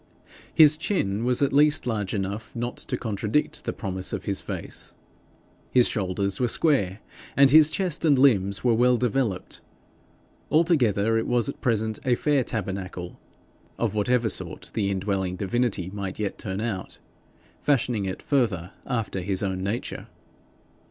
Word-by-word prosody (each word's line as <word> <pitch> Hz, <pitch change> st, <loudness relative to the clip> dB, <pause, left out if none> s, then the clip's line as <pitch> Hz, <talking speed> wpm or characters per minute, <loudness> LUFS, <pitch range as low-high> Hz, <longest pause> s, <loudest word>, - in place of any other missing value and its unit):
His 155 Hz, -1 st, +6 dB
chin 115 Hz, -, -1 dB
was 125 Hz, +2 st, +2 dB
at 140 Hz, -, +1 dB
least 150 Hz, +2 st, +4 dB
large 110 Hz, -4 st, -2 dB
enough 100 Hz, +3 st, -4 dB
not 120 Hz, +1 st, -3 dB
to -, -, -3 dB
contradict 110 Hz, +5 st, -1 dB
the -, -, -1 dB
promise 95 Hz, -1 st, -4 dB
of -, -, -4 dB
his 100 Hz, -2 st, -1 dB
face; -, -, -6 dB, 0.7 s
his 125 Hz, -2 st, +4 dB
shoulders 100 Hz, -1 st, -1 dB
were 125 Hz, -, +2 dB
square, 115 Hz, -, +1 dB, 0.4 s
and 135 Hz, -1 st, +6 dB
his 155 Hz, 0 st, +8 dB
chest 180 Hz, -3 st, -1 dB
and 150 Hz, -4 st, +4 dB
limbs 100 Hz, -8 st, +3 dB
well 125 Hz, +1 st, +4 dB
developed: 120 Hz, -5 st, -1 dB, 0.9 s
altogether 115 Hz, -, +3 dB
it -, -, -3 dB
was 120 Hz, -2 st, +1 dB
at -, -, -7 dB
present 110 Hz, -2 st, 0 dB
a 125 Hz, -2 st, +2 dB
fair 145 Hz, 0 st, +1 dB
tabernacle 95 Hz, -5 st, -5 dB, 0.6 s
of 115 Hz, -3 st, -1 dB
whatever 115 Hz, +3 st, +1 dB
sort -, -, -4 dB
the 100 Hz, -3 st, 0 dB
indwelling 95 Hz, -1 st, -1 dB
divinity 100 Hz, -1 st, -1 dB
might 100 Hz, -2 st, -5 dB
yet 105 Hz, -2 st, -3 dB
turn 95 Hz, 0 st, -4 dB
out, 105 Hz, -5 st, -4 dB, 0.6 s
fashioning 120 Hz, -7 st, +1 dB
it 95 Hz, -, -5 dB
further 105 Hz, -, 0 dB, 0.2 s
after 115 Hz, -7 st, -2 dB
his 95 Hz, +2 st, -2 dB
own 95 Hz, -1 st, -2 dB
nature. 100 Hz, +5 st, -4 dB
110 Hz, 145 wpm, -25 LUFS, 100-125 Hz, 0.9 s, his